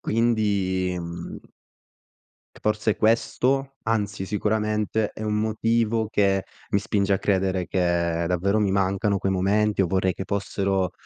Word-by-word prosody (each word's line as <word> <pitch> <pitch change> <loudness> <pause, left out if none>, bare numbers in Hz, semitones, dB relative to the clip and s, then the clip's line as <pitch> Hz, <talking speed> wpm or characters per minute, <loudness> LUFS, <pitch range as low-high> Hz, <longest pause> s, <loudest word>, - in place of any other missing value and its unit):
Quindi, 100 -5 +1
mhmm 85 0 -8 1.1
c - - -15
forse 105 0 0
questo, 130 +4 +1
anzi, 105 -3 -1
sicuramente, 105 +1 0
è - - -8
un 105 -1 -1
motivo 110 +1 +1
che 95 -3 +2 0.3
mi 100 - +3
spinge 100 -1 0
a 95 - +2
credere 95 -2 0
che 85 -2 0
davvero 90 +4 +1
mi 105 -2 +2
mancano 100 +1 +1
quei 95 - -1
momenti 100 +2 +2
o - - +1
vorrei 95 +1 +1
che 95 - -5
fossero, 95 -2 -1
100 Hz, 135 wpm, -24 LUFS, 95-110 Hz, 1.1 s, mi